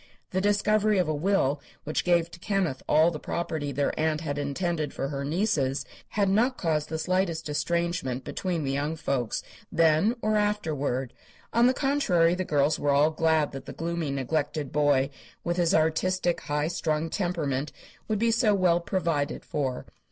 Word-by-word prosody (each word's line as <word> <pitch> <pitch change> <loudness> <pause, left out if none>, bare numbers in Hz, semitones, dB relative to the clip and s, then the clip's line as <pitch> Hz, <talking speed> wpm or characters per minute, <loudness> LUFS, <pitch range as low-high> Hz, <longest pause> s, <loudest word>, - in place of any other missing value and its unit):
The 190 - 0
discovery 205 +1 +2
of 180 -3 +2
a 155 - 0
will 150 -3 +1 0.2
which 155 - -1
gave 170 -1 +2
to 175 - -11
Kenneth 185 -9 -1
all 160 +3 +5
the 155 - -5
property 160 -4 -3
their 140 +1 0
aunt 155 0 +1
had 145 -3 -3
intended 155 +1 -2
for 135 - -2
her 140 -1 -3
nieces 150 -4 0 0.2
had 200 -1 0
not 235 +7 +2
caused 155 -3 -1
the 160 - -2
slightest 180 -1 0
estrangement 170 -4 -1
between 175 -4 -2
the 135 - -1
young 145 +3 -1
folks, 140 -7 -2 0.3
then 165 +6 +3
or 215 0 +2
afterward. 150 - -1 0.4
On 235 +1 +5
the 255 - +2
contrary, 205 - +2
the 185 +1 -1
girls 145 -2 +1
were 145 - 0
all 145 +2 +4
glad 160 -1 +2
that 135 - -8
the - - -6
gloomy, 170 -2 -3
neglected 145 +1 -2
boy, 145 -2 +2 0.3
with 175 0 -1
his 175 -2 +3
artistic, 175 +3 +1
high 150 +1 -1
strung 160 -1 -1
temperament, 150 -7 -1 0.4
would 215 - 0
be 230 +2 +2
so 220 -2 +3
well 180 -3 +3
provided 165 -5 -1
for. 135 -4 -2
160 Hz, 170 wpm, -27 LUFS, 145-185 Hz, 0.4 s, all